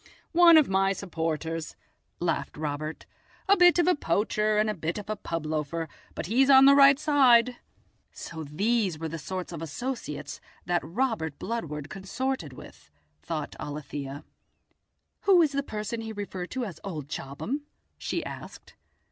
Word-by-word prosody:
"Oh, - - -22 0.3
one 340 -2 +9
of 305 - +5
my 195 0 +2
supporters," 165 -3 -3 0.4
laughed 170 -3 -2
Robert; 155 +1 -4 0.4
"a 400 - +6
bit 355 -2 +6
of 345 - +4
a 360 - +5
poacher 210 - 0
and 215 +1 +3
a 215 - 0
bit 165 -2 -3
of 210 0 -5
a - - -1
pub 165 -5 -4
loafer, 155 +1 -2 0.3
but - - -4
he's 255 - +3
on 270 0 +8
the 275 - +8
right 275 -1 +7
side." 250 -5 +4 0.5
So 160 -1 -7
these 195 +4 0
were 160 +1 -4
the 165 +1 -5
sort 185 +4 -5
of 165 -2 -6
associates 150 - -5 0.2
that 175 0 +1
Robert 170 - -2
Bludward 150 -11 -4
consorted 195 - -3
with, 125 - -13 0.3
thought 155 -3 -4
Alethia. 145 -1 -6 1.0
"Who 385 -2 +6
is 300 - +1
the 280 0 0
person 215 -3 -4
he 225 0 -6
referred 195 -3 -5
to 260 -2 -3
as 190 -6 -8
old 160 -8 -5
Chobham?" 215 - -5 0.3
she - - -3
asked. - - -9
195 Hz, 160 wpm, -27 LUFS, 155-250 Hz, 1.0 s, one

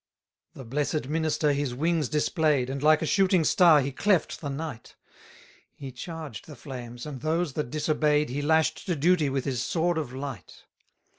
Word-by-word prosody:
272 - - -15
The 130 - -9 0.4
blessed 130 - -10
minister 155 -2 +1
his 140 -3 -2
wings 160 0 0
display'd, 150 -4 +1
And 135 0 -4
like 155 +1 +4
a - - 0
shooting 185 0 +3
star 165 -2 +5
he 140 +1 -3
cleft 190 +4 0
the 145 - -4
night: 140 -4 -6 0.8
He 135 -2 -8
charged 155 - -8
the 150 - -10
flames, 120 -2 -8
and 140 -5 -7
those 160 0 -1
that 150 -4 -3
disobey'd 150 0 +1
He 140 +4 -3
lash'd 160 +5 +1
to 175 - 0
duty 160 0 +2
with 135 -1 -2
his 130 -3 -1
sword 170 +4 0
of 145 -6 -5
light. 135 -1 -8
150 Hz, 175 wpm, -27 LUFS, 135-160 Hz, 0.8 s, star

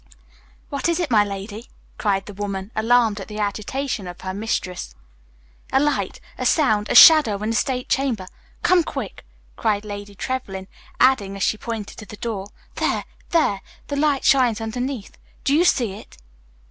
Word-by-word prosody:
"What 280 +3 -1
is 340 - +1
it, 340 -7 -1
my 210 -2 +6
lady?" 205 +3 -6 0.3
cried 195 -2 0
the 205 - -9
woman, 200 0 -4
alarmed 225 -1 +3
at 195 - -7
the 210 - -8
agitation 215 +2 -2
of 175 +1 -9
her 185 0 -4
mistress. 185 - -3 0.8
"A 265 - +4
light, 295 +1 0 0.2
a - - -2
sound, 215 -9 +2
a - - 0
shadow 290 -7 +9
in 220 - 0
the - - -1
state 250 +2 0
chamber. 250 -8 0 0.4
Come 365 -2 +4
quick!" - - -6 0.3
cried 215 -2 0
Lady 205 -1 -7
Trevlyn, 195 -6 -4 0.3
adding, 205 -7 +3
as 195 - -2
she - - +2
pointed 220 -2 -6
to 215 - -10
the 210 - -10
door, 205 -3 -4 0.3
"There, - - 0 0.3
there, 255 - +2 0.3
the 285 - -2
light 285 -1 +1
shines 245 -5 +4
underneath. 240 +1 -4 0.2
Do 275 - +2
you 320 +4 +5
see 240 - +2
it?" 200 - -12
220 Hz, 170 wpm, -22 LUFS, 200-260 Hz, 0.8 s, shadow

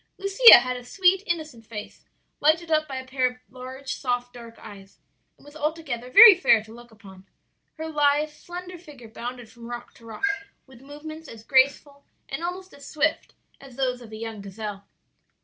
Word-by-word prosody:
"Lucia 395 +5 +8
had 250 +1 -2
a 250 - -8
sweet, 370 +7 +2
innocent 310 -8 -4
face, 210 -2 -10 0.3
lighted 325 +3 +1
up 310 0 +2
by 270 - -7
a 260 0 -6
pair 260 0 0
of 250 - -15
large, 260 +2 -7
soft, 245 -2 -3
dark 235 -1 -12
eyes, 200 -2 -14 0.4
and - - -22
was 290 +1 -15
altogether 300 -6 -4
very 455 - +10
fair 235 - +3
to 220 0 -15
look 240 +1 -14
upon. 195 -4 -16 0.5
Her 320 0 -5
lithe, 295 0 +1
slender 355 +2 -10
figure 285 -9 -14
bounded 245 +1 -8
from 230 +1 -13
rock 240 0 -8
to 230 - -19
rock 220 - -10 0.4
with 260 -2 -18
movements 310 +3 -10
as 225 -1 -12
graceful 280 +2 +1 0.2
and 275 +5 -6
almost 370 +2 -6
as 280 0 -13
swift 310 +1 -2 0.2
as 270 -3 -14
those 250 -2 -2
of 225 -2 -13
a - - -8
young 225 -2 -7
gazelle. 200 0 -8
260 Hz, 185 wpm, -24 LUFS, 235-310 Hz, 0.5 s, very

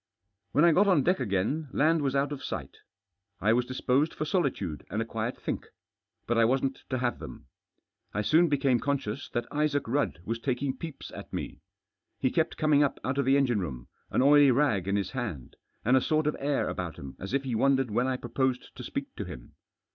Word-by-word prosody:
When 150 - +5
I 170 - +7
got 200 +6 +4
on 180 -8 +4
deck 180 +2 +2
again 120 +7 -1
land 160 +2 +3
was 140 -1 0
out 140 +1 +1
of 145 - -5
sight: - - -5 0.6
I 110 +3 +3
was 125 +1 +1
dispose} 130 +4 +1
for - - -4
^olityde 135 - -1
and 110 - -2
a 115 - 0
quiet 115 +2 -3
think. - - -4 0.6
But 120 0 +1
I - - +6
wasn't 135 +2 +1
to 130 - 0
have 120 -1 -1
them. - - -9 0.7
I 105 - -1
soon 165 +9 +4
became 135 -4 +2
conscious 140 -3 -2
that 120 0 -2
Isaac 145 -2 0
Ri|dd 140 - 0
was 115 +1 -2
taking 130 +2 -1
peeps 155 +1 -8
at - - -9
n*e. - - -5 0.6
He 130 - 0
kept 160 -1 0
cqming 150 -2 +4
up 140 - -1
out 130 +2 -1
of 140 - +2
the 135 +1 +4
engine 125 -6 +2
room, 65 -9 -5 0.2
aP - - +1
°ily 140 -6 +5
*P 100 - +1
his 100 -2 -2
hand, 110 - -5 0.3
and 125 +4 +5
a 130 - +5
sort 155 +2 +1
of 150 - +1
air 140 0 0
abput - - -4
hina 70 - -8
a§ 95 +6 -6
if 140 - 0
he 130 -3 -3
wondered 135 +1 +2
when 120 +4 +1
I 130 -1 0
proposed 125 +1 -2
to - - -7
speak - - -5
to - - -3
him. - - -10
130 Hz, 210 wpm, -28 LUFS, 115-145 Hz, 0.7 s, I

